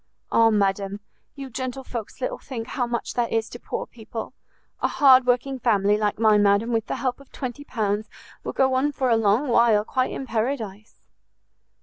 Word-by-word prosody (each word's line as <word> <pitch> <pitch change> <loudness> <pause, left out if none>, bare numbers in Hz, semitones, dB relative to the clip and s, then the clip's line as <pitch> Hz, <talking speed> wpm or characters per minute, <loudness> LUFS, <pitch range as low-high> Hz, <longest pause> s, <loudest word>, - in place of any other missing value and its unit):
"Ah, 230 0 +5
madam, 200 -1 0 0.4
you 275 -1 -7
gentlefolks 255 -2 -6
little 255 - -2
think 240 -3 -7
how 245 -2 -1
much 235 0 -3
that 240 -1 -1
is 225 0 0
to 240 - -9
poor - - -4
people! 225 -1 -8 0.5
A - - +3
hard 260 -3 +5
working 255 +2 +1
family, 205 -4 +3
like 210 -1 0
mine, 215 -1 +4
madam, 205 +3 +3
with 225 -1 0
the - - -2
help 255 -1 -2
of 275 - -17
20 260 +1 -6
pounds 210 -2 -2 0.3
will - - -3
go 265 -1 +2
on 265 +3 +2
for 260 -2 0
a - - +5
long 225 +5 +2
while 235 -3 +4
quite 255 +2 0
in 270 - -5
paradise." 220 -3 -3
235 Hz, 185 wpm, -24 LUFS, 215-255 Hz, 0.5 s, Ah